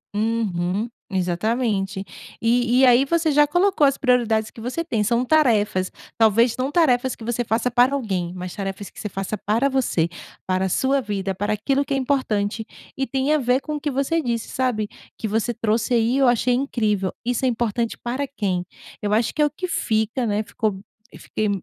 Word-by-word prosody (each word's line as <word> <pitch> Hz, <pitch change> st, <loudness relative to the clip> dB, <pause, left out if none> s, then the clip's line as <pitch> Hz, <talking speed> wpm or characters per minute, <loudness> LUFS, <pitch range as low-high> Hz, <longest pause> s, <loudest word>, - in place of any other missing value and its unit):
Uhum, 210 Hz, -2 st, -1 dB, 0.2 s
exatamente, 195 Hz, +2 st, -1 dB, 0.3 s
e 245 Hz, +2 st, +3 dB
e -, -, +7 dB
aí 250 Hz, +1 st, +6 dB
você 320 Hz, +2 st, +1 dB
já 295 Hz, +1 st, +5 dB
colocou 350 Hz, -2 st, +3 dB
as 275 Hz, -, +1 dB
prioridades 230 Hz, -4 st, +2 dB
que 225 Hz, -, -12 dB
você 255 Hz, +8 st, -3 dB
tem, 225 Hz, -9 st, 0 dB
são 235 Hz, +4 st, +1 dB
tarefas, 220 Hz, -10 st, +2 dB, 0.2 s
talvez 225 Hz, +1 st, +4 dB
não 260 Hz, +3 st, -2 dB
tarefas 260 Hz, -6 st, +2 dB
que 225 Hz, -, -12 dB
você 240 Hz, +1 st, -1 dB
faça 230 Hz, +2 st, 0 dB
para 250 Hz, +3 st, +4 dB
alguém, 190 Hz, -9 st, -2 dB
mas 180 Hz, 0 st, -6 dB
tarefas 195 Hz, 0 st, -5 dB
que -, -, -13 dB
você 210 Hz, -, -4 dB
faça 195 Hz, +3 st, -3 dB
para 230 Hz, +8 st, +1 dB
você, 250 Hz, -11 st, +1 dB, 0.4 s
para 185 Hz, 0 st, 0 dB
a 190 Hz, -, -1 dB
sua 270 Hz, +7 st, +1 dB
vida, 195 Hz, -4 st, -3 dB
para 205 Hz, +3 st, -1 dB
aquilo 270 Hz, +7 st, 0 dB
que 275 Hz, 0 st, -2 dB
é -, -, +1 dB
importante 230 Hz, -6 st, 0 dB, 0.3 s
e 270 Hz, 0 st, -2 dB
tenha 275 Hz, +4 st, +1 dB
a -, -, -1 dB
ver 250 Hz, 0 st, +2 dB
com 305 Hz, -, -5 dB
o 295 Hz, -, -5 dB
que 300 Hz, -, -1 dB
você 280 Hz, +5 st, 0 dB
disse, 235 Hz, -4 st, -2 dB
sabe, 245 Hz, -5 st, -1 dB, 0.3 s
que 220 Hz, -, -3 dB
você 225 Hz, +3 st, 0 dB
trouxe 225 Hz, +1 st, 0 dB
aí, 235 Hz, +3 st, +2 dB
eu 270 Hz, -, +4 dB
achei 245 Hz, +1 st, +3 dB
incrível. 215 Hz, -7 st, 0 dB
"Isso 245 Hz, +1 st, -1 dB
é 260 Hz, -, +4 dB
importante 235 Hz, -1 st, -1 dB
para 255 Hz, +4 st, -3 dB
quem?", 200 Hz, -9 st, -2 dB, 0.4 s
eu 205 Hz, 0 st, -1 dB
acho 225 Hz, +2 st, +1 dB
que 305 Hz, -, -1 dB
é 300 Hz, -, +6 dB
o -, -, +1 dB
que 365 Hz, +5 st, -5 dB
fica, 225 Hz, -5 st, 0 dB
né, 210 Hz, 0 st, 0 dB
ficou 210 Hz, -2 st, -2 dB, 0.4 s
fiquei 215 Hz, -, -3 dB
235 Hz, 195 wpm, -22 LUFS, 210-265 Hz, 0.4 s, e